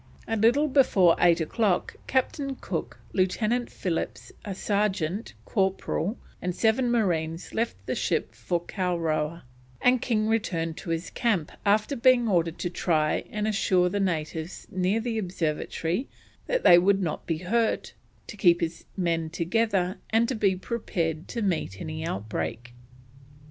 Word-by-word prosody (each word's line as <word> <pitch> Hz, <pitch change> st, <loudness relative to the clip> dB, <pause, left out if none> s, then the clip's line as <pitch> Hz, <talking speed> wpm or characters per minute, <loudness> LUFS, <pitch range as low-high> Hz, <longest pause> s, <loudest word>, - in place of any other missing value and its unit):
A 225 Hz, -, 0 dB
little 240 Hz, +8 st, +4 dB
before 210 Hz, -, +5 dB
eight 170 Hz, -1 st, +5 dB
o'clock 195 Hz, +3 st, 0 dB
Captain 270 Hz, +1 st, 0 dB
Cook, -, -, -4 dB, 0.2 s
Lieutenant 215 Hz, +6 st, +1 dB
Phillips, 170 Hz, -3 st, -3 dB
a 200 Hz, -2 st, -5 dB
sergeant, 200 Hz, -1 st, -1 dB
corporal, 195 Hz, 0 st, 0 dB, 0.2 s
and 180 Hz, -1 st, -2 dB
seven 230 Hz, +4 st, +2 dB
marines 170 Hz, -8 st, 0 dB
left 230 Hz, +1 st, -1 dB
the -, -, -1 dB
ship -, -, -1 dB
for 175 Hz, -2 st, -1 dB
Kowrowa, 170 Hz, -3 st, -1 dB, 0.4 s
and 250 Hz, -1 st, +3 dB
King 215 Hz, -3 st, +1 dB
returned 175 Hz, -8 st, 0 dB
to -, -, -8 dB
his 165 Hz, +1 st, -2 dB
camp 195 Hz, -10 st, 0 dB, 0.2 s
after 215 Hz, +7 st, +3 dB
being 245 Hz, -1 st, +4 dB
ordered 170 Hz, -4 st, +1 dB
to 175 Hz, -, -2 dB
try 155 Hz, -4 st, +1 dB
and 210 Hz, 0 st, -2 dB
assure 185 Hz, -4 st, +2 dB
the 205 Hz, -, -1 dB
natives 165 Hz, -2 st, -2 dB
near 185 Hz, +4 st, +1 dB
the 225 Hz, -1 st, -2 dB
observatory 175 Hz, -, -2 dB, 0.4 s
that -, -, 0 dB
they 175 Hz, -, +9 dB
would 195 Hz, +2 st, +3 dB
not 160 Hz, -4 st, -3 dB
be 165 Hz, -, 0 dB
hurt, 220 Hz, +7 st, 0 dB, 0.3 s
to -, -, -9 dB
keep 175 Hz, -4 st, +4 dB
his 165 Hz, 0 st, -3 dB
men 165 Hz, -3 st, 0 dB
together, 185 Hz, +2 st, 0 dB
and 225 Hz, +1 st, +3 dB
to -, -, 0 dB
be 200 Hz, -5 st, +2 dB
prepared 175 Hz, -6 st, -3 dB
to 235 Hz, -, -3 dB
meet 160 Hz, -, -1 dB
any 155 Hz, 0 st, -5 dB
outbreak. 115 Hz, 0 st, -4 dB
185 Hz, 145 wpm, -27 LUFS, 165-225 Hz, 0.4 s, they